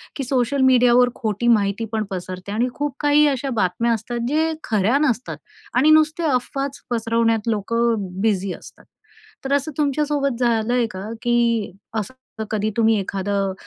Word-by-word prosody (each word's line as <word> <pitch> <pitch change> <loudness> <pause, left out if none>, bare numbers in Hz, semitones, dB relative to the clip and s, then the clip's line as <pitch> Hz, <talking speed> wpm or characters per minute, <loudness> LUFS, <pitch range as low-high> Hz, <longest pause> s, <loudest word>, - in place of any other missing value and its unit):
की 275 - -3
सोशल 260 +1 0
मीडियावर 250 -1 +5
खोटी 220 +1 -2
माहिती 210 -1 +2
पण 220 -1 -1
पसरते 185 +1 -6
आणि 230 +4 +1
खूप 290 -1 -3
काही 295 0 +4
अशा 275 -1 -1
बातम्या 190 +6 +1
असतात 235 +2 -4
जे 315 +4 +1
खऱ्या 215 +3 +1
नसतात 245 -1 -2 0.4
आणि 295 +5 +5
नुसत्या 310 +1 +3
अफवाच 275 +2 -2
पसरवण्यात 230 -1 +1
लोकं 230 +2 +1 0.3
बिझी 200 -3 0
असतात. - - -14 0.6
तर 270 - 0
असं 285 +2 0
तुमच्यासोबत 290 -2 0
झालं 235 -1 +1
आहे 245 -1 +2
का, 190 +3 -7
की 235 -3 +1 0.3
असं 240 +1 -8
कधी 215 0 0
तुम्ही 225 -2 +3
एखादं 195 0 -2
235 Hz, 150 wpm, -21 LUFS, 215-270 Hz, 0.6 s, मीडियावर